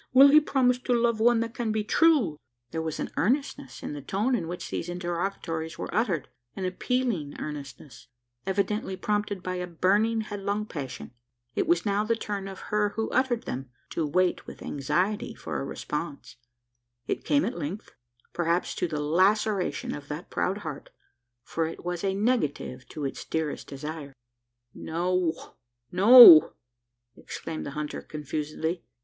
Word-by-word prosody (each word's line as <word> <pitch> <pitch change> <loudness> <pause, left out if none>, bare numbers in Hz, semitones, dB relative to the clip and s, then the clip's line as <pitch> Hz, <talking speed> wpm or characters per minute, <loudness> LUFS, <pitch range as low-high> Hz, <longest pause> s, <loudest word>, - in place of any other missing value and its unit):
Will 270 +2 +9
he 300 +2 +8
promise 250 -4 +2
to 250 -1 0
love 235 -1 +1
one 235 0 +4
that 230 0 -3
can 235 -3 -2
be 215 0 0
true?" 260 - +3 0.4
There 160 - -2
was 160 -1 -4
an - - -3
earnestness 275 - -1
in - - -4
the 145 - -6
tone 205 - 0
in 220 -9 0
which 180 +1 -6
these 170 - -3
interrogatories 175 -2 -3
were - - -5
uttered 190 - 0 0.3
an 190 - -3
appealing 185 - -1
earnestness 135 -4 -8 0.4
evidently 195 0 -1
prompted 205 -2 -2
by 185 0 -3
a 180 0 -3
burning 205 +6 +2
headlong 205 0 -3
passion. 145 -12 -7 0.4
It - - 0
was 170 0 +2
now 205 0 +1
the 230 +1 +1
turn 205 -3 -4
of 195 -1 -8
her 210 -1 +2
who 220 +1 -2
uttered 255 -2 +1
them, 130 0 -5 0.2
to 165 - -1
wait 180 +4 +1
with - - -10
anxiety 180 +9 -1
for - - -4
a - - -3
response. 150 +1 -5 0.7
It - - -3
came 290 0 +2
at 245 - -3
length 190 +9 -5 0.4
perhaps 170 +1 0
to 180 - 0
the 155 -2 -3
laceration 190 +6 +1
of 145 -1 -8
that 150 +4 -7
proud 190 +2 0
heart: 150 -3 -6 0.5
for 165 +4 -2
it 165 - -9
was 175 0 -3
a 195 -1 0
negative 195 - -1
to 150 -2 -5
its 135 - -4
dearest 160 -2 -3
desire. 145 0 -7 0.6
"No, 175 0 -2 0.4
no!" 195 - +10 0.6
exclaimed 160 -1 -6
the - - -5
hunter 150 0 -4
confusedly. 155 +3 -4
185 Hz, 160 wpm, -27 LUFS, 155-215 Hz, 0.7 s, no